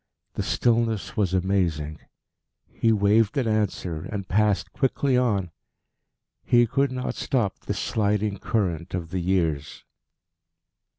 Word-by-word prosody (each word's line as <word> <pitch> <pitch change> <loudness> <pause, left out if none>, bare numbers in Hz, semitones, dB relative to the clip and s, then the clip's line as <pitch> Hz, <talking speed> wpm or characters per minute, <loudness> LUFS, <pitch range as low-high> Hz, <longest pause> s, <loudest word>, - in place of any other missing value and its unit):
The - - -3
stillness 115 -3 0
was 100 -4 +1
amazing. 85 -5 0 0.7
He 115 - +1
waved 105 +4 +3
an 130 -4 +1
answer, 105 -6 -1
and 100 -3 -4
passed 105 0 +1
quickly 135 0 +1
on. 105 -8 +1 0.9
He 120 -1 +4
could 135 +4 +1
not 125 0 -3
stop 115 -8 -1
this - - -2
sliding 105 -1 0
current 90 -6 -1
of 85 -2 -5
the 95 - -1
years. 85 -5 -1
105 Hz, 120 wpm, -25 LUFS, 90-115 Hz, 0.9 s, He